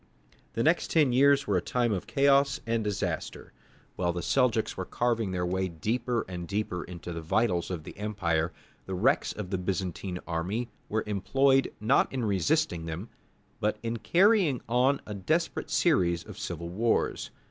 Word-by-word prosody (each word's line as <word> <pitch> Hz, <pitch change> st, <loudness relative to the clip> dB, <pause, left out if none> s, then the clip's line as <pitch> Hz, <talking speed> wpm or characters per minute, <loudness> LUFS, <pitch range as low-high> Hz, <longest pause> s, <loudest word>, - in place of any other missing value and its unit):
The 115 Hz, -, 0 dB
next 165 Hz, +3 st, +2 dB
ten 150 Hz, -6 st, +3 dB
years 140 Hz, +2 st, +5 dB
were 100 Hz, -6 st, +1 dB
a -, -, +1 dB
time 120 Hz, +5 st, 0 dB
of 95 Hz, -4 st, -2 dB
chaos 140 Hz, 0 st, +3 dB
and 115 Hz, -1 st, 0 dB
disaster. 105 Hz, -2 st, -3 dB, 0.4 s
While 85 Hz, -1 st, 0 dB
the 90 Hz, -, -4 dB
Seljouks 125 Hz, -5 st, +1 dB
were -, -, -3 dB
carving 115 Hz, -4 st, 0 dB
their 90 Hz, -1 st, -1 dB
way 95 Hz, +1 st, 0 dB
deeper 115 Hz, +8 st, -1 dB
and 90 Hz, -2 st, -6 dB
deeper 100 Hz, -4 st, -2 dB
into 85 Hz, 0 st, -7 dB
the 85 Hz, -, -5 dB
vitals 90 Hz, +1 st, +1 dB
of 85 Hz, -4 st, -4 dB
the -, -, -10 dB
empire, 85 Hz, -6 st, 0 dB, 0.4 s
the 95 Hz, -, -3 dB
wrecks 115 Hz, +9 st, +2 dB
of 100 Hz, -3 st, -6 dB
the 95 Hz, -, 0 dB
Byzantine 90 Hz, 0 st, -3 dB
army 95 Hz, +9 st, -2 dB, 0.2 s
were 110 Hz, +1 st, 0 dB
employed 135 Hz, +7 st, +2 dB
not 110 Hz, +6 st, +3 dB
in 130 Hz, -3 st, -2 dB
resisting 95 Hz, -, +1 dB
them, 85 Hz, +7 st, -5 dB, 0.5 s
but 105 Hz, +1 st, 0 dB
in 115 Hz, 0 st, -2 dB
carrying 180 Hz, -, +3 dB
on 125 Hz, +4 st, +2 dB
a 105 Hz, -, -6 dB
desperate 155 Hz, -, -1 dB
series 85 Hz, -, +2 dB
of -, -, -11 dB
civil 85 Hz, 0 st, -5 dB
wars. 110 Hz, +6 st, 0 dB
105 Hz, 170 wpm, -28 LUFS, 90-125 Hz, 0.5 s, years